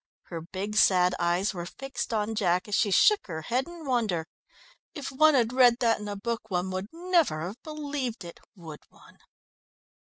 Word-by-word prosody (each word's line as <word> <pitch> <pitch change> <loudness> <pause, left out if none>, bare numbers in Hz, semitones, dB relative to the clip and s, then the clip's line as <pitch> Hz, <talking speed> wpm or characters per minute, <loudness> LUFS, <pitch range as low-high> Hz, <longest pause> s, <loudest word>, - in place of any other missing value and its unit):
Her 165 -2 -7
big, 195 +5 -5
sad 180 -3 +4
eyes 175 +4 +1
were 175 -2 -6
fixed 270 +3 -6
on 215 0 -1
Jack 185 -4 0
as 210 - -7
she 205 - +2
shook 415 - +4
her 160 -3 -5
head 255 - -1
in 345 -2 -10
wonder. 220 - 0 0.7
"If 280 -3 -5
one 310 +3 +5
had 240 -2 +2
read 245 -2 +5
that 230 -2 +2
in 210 - -7
a 205 - -4
book 225 +2 -4
one 185 0 -1
would 185 +1 -4
never 335 - +1
have 190 +8 -6
believed 285 - -5
it, 170 - -10 0.2
would 160 -5 -10
one?" - - -20
215 Hz, 185 wpm, -27 LUFS, 180-265 Hz, 0.7 s, one